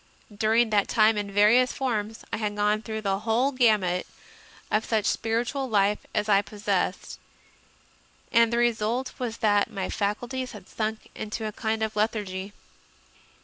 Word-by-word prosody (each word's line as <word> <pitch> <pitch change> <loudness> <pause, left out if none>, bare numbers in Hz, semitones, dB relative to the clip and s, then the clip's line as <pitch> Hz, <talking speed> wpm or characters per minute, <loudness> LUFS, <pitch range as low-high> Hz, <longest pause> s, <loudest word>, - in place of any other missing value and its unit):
During 220 +2 +2
that 205 -2 +3
time, 215 0 +4
in 205 -1 -3
various 220 +5 +5
forms, 225 -5 -3
I - - 0
had 210 -1 -2
gone 210 +1 +1
through 220 -1 -5
the 195 -2 0
whole 230 +5 +1
gamut 210 -8 +2 0.6
of 215 +1 +2
such 220 -3 0
spiritual 240 +4 -1
life 205 -1 +2 0.2
as 210 0 0
I 200 -1 +5
possessed, 200 -1 -2 1.1
and 230 0 +4
the 235 - 0
result 240 +1 0
was 235 -3 -3
that 205 0 +3
my 195 -4 -4
fac 205 +1 -1
ulties 255 +1 -5
had 195 -3 -11
sunk 220 0 -4
into 220 +1 -5
a 215 - -2
kind 220 +1 -2
of 220 -1 -2
lethargy. 205 -3 -2
215 Hz, 155 wpm, -26 LUFS, 205-230 Hz, 1.1 s, various